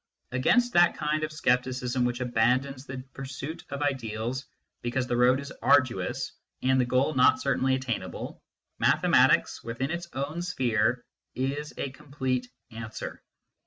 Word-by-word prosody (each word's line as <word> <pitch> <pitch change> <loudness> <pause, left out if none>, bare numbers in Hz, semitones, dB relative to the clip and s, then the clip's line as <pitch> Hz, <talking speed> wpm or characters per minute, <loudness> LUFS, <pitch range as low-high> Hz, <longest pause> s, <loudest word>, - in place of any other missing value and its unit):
Against 240 - +3
that 175 0 +5
kind 155 0 0
of 155 - -2
scepticism 125 -3 +1
which 120 +1 -1
abandons 125 +3 +1
the 130 -1 -6
pursuit 135 +4 -6
of 140 +1 -3
ideals 125 -2 -2 0.4
because 120 +2 -1
the 120 - -1
road 125 +2 +4
is 140 0 -7
arduous 125 -10 +2 0.3
and 130 0 +4
the - - +1
goal 130 +5 +2
not 130 - +5
cer - - +1
tainly 130 0 +2
attainable, 130 -3 -4 0.4
mathematics, - - +4
within 120 +5 -3
its 170 0 -4
own 145 +5 -3
sphere, 120 -8 +1 0.3
is 140 +3 -2
a 135 - -3
complete 130 -3 -3 0.2
answer. 110 -1 -7
130 Hz, 140 wpm, -28 LUFS, 125-145 Hz, 0.4 s, that